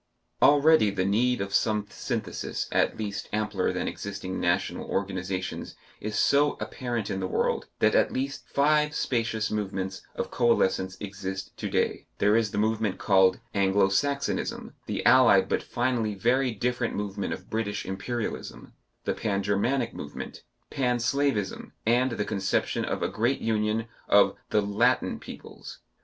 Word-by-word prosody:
Already 145 -5 +6
the 95 -2 -1
need 120 +4 +2
of 100 0 -4
some 105 -1 +2
synthesis 105 -7 -3
at - - +2
least 100 -2 -4
ampler 105 0 0
than - - -2
existing 100 -2 -5
national 85 +2 0
organizations 95 -1 -3 0.2
is 105 0 -4
so 145 +1 +4
apparent 120 -5 -3
in 95 - -2
the 95 - -2
world, - - 0
that - - +3
at - - +3
least 140 +2 -4
five 150 +1 +2
spacious 115 -3 -1
movements 95 -2 -3
of - - -3
coalescence 95 -5 +2
exist 95 -1 -6
to - - -3
day; - - 0
there 105 +1 +3
is 115 -2 +2
the 100 - -5
movement 110 -2 +1
called 95 -1 +4
Anglo 95 0 +3
Saxonism, 140 +8 -1
the - - -3
allied - - +6
but - - 0
finally 120 -3 -1
very 125 +6 +2
different 120 +2 -1
movement 100 -1 -3
of 95 - -6
British 105 -2 -2
Imperialism, 110 +5 -5 0.3
the - - 0
Pan 100 -2 -1
Germanic 115 +5 0
movement, 75 - -7 0.3
Pan 125 -2 +1
Slavism, 120 -3 -1
and 120 +2 +3
the 105 -2 -2
conception 95 -3 0
of - - -2
a - - +2
great 120 +5 0
union 110 0 0 0.2
of - - +5
the 105 - +3
"Latin" 115 +6 +1
peoples. - - -10
105 Hz, 150 wpm, -27 LUFS, 100-120 Hz, 0.3 s, Already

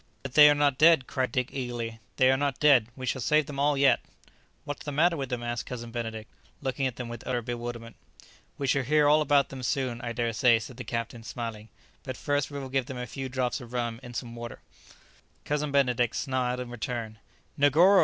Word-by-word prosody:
"But 135 -2 -6
they 150 0 +9
are 145 - +4
not 145 -2 +2
dead," 160 -4 +6
cried 130 0 -2
Dick 125 0 0
eagerly; 120 -3 -4 0.2
"they 130 0 +5
are - - +4
not 140 0 -1
dead; 135 -7 +5
we 130 - -6
shall 130 +1 -1
save 150 +4 +3
them 140 -1 -7
all 145 0 +2
yet!" 140 0 +5 0.6
"What's 145 - -6
the 145 - -4
matter 165 +4 +3
with 135 -4 -4
them?" 125 -2 -3
asked 120 -1 -3
Cousin 120 -2 -6
Benedict, 115 -2 -5 0.3
looking 135 0 -1
at 125 - -5
them 120 0 -6
with 120 0 -8
utter 125 -2 -1
bewilderment. 120 -1 -6 0.6
"We 140 - -2
shall 135 +1 +2
hear 150 +3 +3
all 150 +1 +5
about 145 -1 +3
them 135 -1 -7
soon, 125 -2 -1
I 120 - -4
dare 115 0 -1
say," 120 +1 +5
said 115 +2 -8
the 125 - -5
captain, 115 +1 -4
smiling; 110 0 -6 0.3
"but 130 -2 -6
first 145 -2 0
we 145 - -6
will 135 -1 -6
give 135 -1 0
them 130 - -6
a 125 - -4
few 130 +3 -6
drops 130 +1 -1
of 120 0 -11
rum 120 -2 -2
in 120 -2 -10
some 120 -1 -5
water." 120 0 -8 0.8
Cousin 150 0 -1
Benedict 125 -4 +2
smiled 125 -1 -1
in 120 -1 -7
return. 115 -2 -5 0.4
"Negoro!" 165 +8 +6
125 Hz, 220 wpm, -28 LUFS, 120-140 Hz, 0.8 s, they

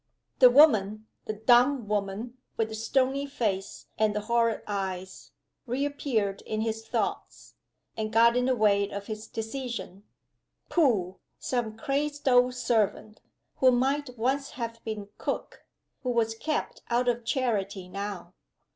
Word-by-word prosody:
The 255 -2 +9
woman 220 -7 +5 0.2
the 215 - -3
dumb 240 +3 +4
woman, 210 +4 -3 0.2
with 225 -1 0
the - - -7
stony 265 +5 0
face 205 -8 -3
and 215 -1 +2
the 210 - 0
horrid 230 0 +1
eyes 190 -2 -5 0.4
reappeared 250 -6 -1
in 215 0 -3
his 225 0 -3
thoughts, - - -3 0.4
and 215 -1 -3
got 230 +1 +5
in 250 0 +2
the 260 0 +2
way 200 -3 +3
of 200 0 -6
his 215 0 -6
decision. 225 -4 -5 0.7
Pooh! 210 - +2 0.2
some 230 -4 -2
crazed 290 +4 -2
old 250 0 +5
servant, 215 -3 0 0.4
who 260 - +5
might 260 +1 0
once 270 +5 -1
have 230 -2 -5
been 210 -2 -5
cook; - - -4 0.3
who 255 - -3
was 230 -2 +1
kept 305 +7 -3
out 245 +1 +1
of 240 -1 +1
charity 210 -7 -1
now. 190 -2 -6
230 Hz, 140 wpm, -28 LUFS, 210-255 Hz, 0.7 s, The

